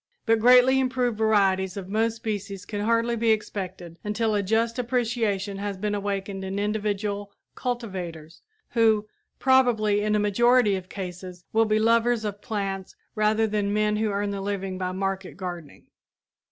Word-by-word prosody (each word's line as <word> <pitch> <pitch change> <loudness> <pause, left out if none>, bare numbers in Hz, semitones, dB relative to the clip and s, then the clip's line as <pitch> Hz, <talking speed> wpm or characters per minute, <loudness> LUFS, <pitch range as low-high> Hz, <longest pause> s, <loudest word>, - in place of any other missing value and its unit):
But 225 -1 +3
greatly 250 +3 +6
improved 250 -3 0
varieties 195 -3 +2
of 190 -2 -6
most 220 +3 0
species 205 -4 -5
can 205 -2 -4
hardly 230 +2 +1
be 230 0 +1
expected 185 -5 -3
until 215 +1 0
a 205 - +2
just 225 +4 0
appreciation 225 -5 -1
has 200 -1 -3
been 210 +2 -2
awakened 200 -1 -3
in 190 +1 -4
individual 205 -1 -2 0.2
cultivators, 185 -10 -5 0.3
who, 220 -2 +3 0.3
probably 235 -6 +3
in 210 0 +1
a - - +2
majority 215 +1 +3
of 185 -1 -6
cases, 180 -2 -7
will 225 0 +4
be 215 0 +2
lovers 230 +1 +2
of 205 0 -4
plants 195 -3 -4 0.2
rather 215 0 +2
than 205 -1 -1
men 210 0 +1
who 215 0 0
earn 200 0 -1
their 200 -1 -4
living 195 -2 -3
by 185 -1 -2
market 190 0 -3
gardening. 175 -5 -7
210 Hz, 155 wpm, -25 LUFS, 195-225 Hz, 0.3 s, greatly